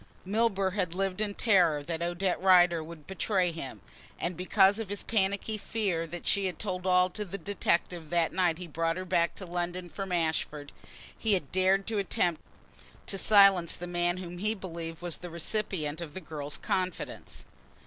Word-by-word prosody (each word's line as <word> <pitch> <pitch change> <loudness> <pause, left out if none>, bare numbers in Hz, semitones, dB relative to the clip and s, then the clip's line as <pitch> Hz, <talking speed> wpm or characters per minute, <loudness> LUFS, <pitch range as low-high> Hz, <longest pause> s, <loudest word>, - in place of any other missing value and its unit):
Milburgh 200 -2 +1
had 180 -4 -1
lived 195 +1 -1
in 205 -2 -1
terror 175 -9 +3
that 165 +2 -4
Odette 175 +2 -1
Rider 175 -3 +5
would 155 -2 -11
betray 190 -2 0
him, 135 - -7 0.4
and 175 +1 -2
because 190 +3 +4
of 220 -4 -4
his 205 - -3
panicky 205 0 0
fear 190 -7 -1
that 175 +1 -8
she 200 -2 +2
had 180 -4 -5
told 185 -3 -4
all 180 0 +5
to 210 - -4
the 200 0 -6
detective 175 -3 -1
that 170 -1 +1
night 175 -4 +2
he 180 - -7
brought 165 +1 -1
her 185 - -4
back 170 -2 +1
to 190 - -7
London 175 0 -3
from 195 +1 -6
Ashford, 160 -3 -1 0.4
he 220 -2 +1
had 180 -8 0
dared 190 +3 +2
attempt 180 -5 0 0.6
to 195 - -3
silence 195 -5 +6
the 175 - -6
man 175 0 0
whom 175 -1 -7
he 215 +3 +1
believed 170 -4 -7
was 175 -2 -3
the 180 - -8
recipient 170 -3 -2
of 155 -3 -7
the - - -4
girl's 150 -3 -5
confidence. 165 - -3
180 Hz, 180 wpm, -29 LUFS, 170-195 Hz, 0.6 s, silence